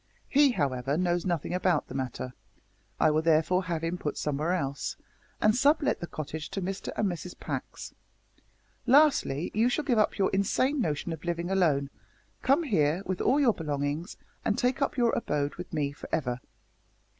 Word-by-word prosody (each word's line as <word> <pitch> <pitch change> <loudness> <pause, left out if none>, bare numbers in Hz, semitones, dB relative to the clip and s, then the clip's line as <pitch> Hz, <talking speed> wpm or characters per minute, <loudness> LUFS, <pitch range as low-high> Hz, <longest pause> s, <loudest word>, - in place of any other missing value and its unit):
He, 285 0 +5
however, 140 - 0
knows 175 0 0
nothing 175 -2 -1
about 180 -1 +1
the - - -9
matter. 130 -1 -4 0.7
I - - +5
will 155 +1 +2
therefore 165 +3 +2
have 165 -2 -2
him 170 +2 -2
put 150 - -3
somewhere 150 +3 -1
else, 140 -5 -2 0.4
and 215 +1 +4
sub 290 +5 +4
let 280 - +1
the 175 - -5
cottage 155 -1 -6
to - - -4
Mr 195 +1 -4
and 215 - +2
Mrs 180 0 -5
Pax. - - -6 0.9
Lastly, 265 - +4
you 225 +3 +3
shall 295 +4 -1
give 245 -6 +2
up 215 - +2
your 195 - +2
insane 255 +8 +1
notion 155 -2 -1
of 160 - -9
living 175 +1 -2
alone, 150 -8 +2 0.5
come 275 +6 +3
here, 170 - +1
with 185 -1 -2
all 275 - +3
your 255 -6 +4
belongings, 150 +2 -3 0.3
and 210 - 0
take 250 +3 +1
up 275 - 0
your 240 -2 +3
abode 145 -10 -1
with 180 - -8
me 145 -3 -1
for 140 - -11
ever." 125 -5 -1
175 Hz, 180 wpm, -28 LUFS, 150-215 Hz, 0.9 s, He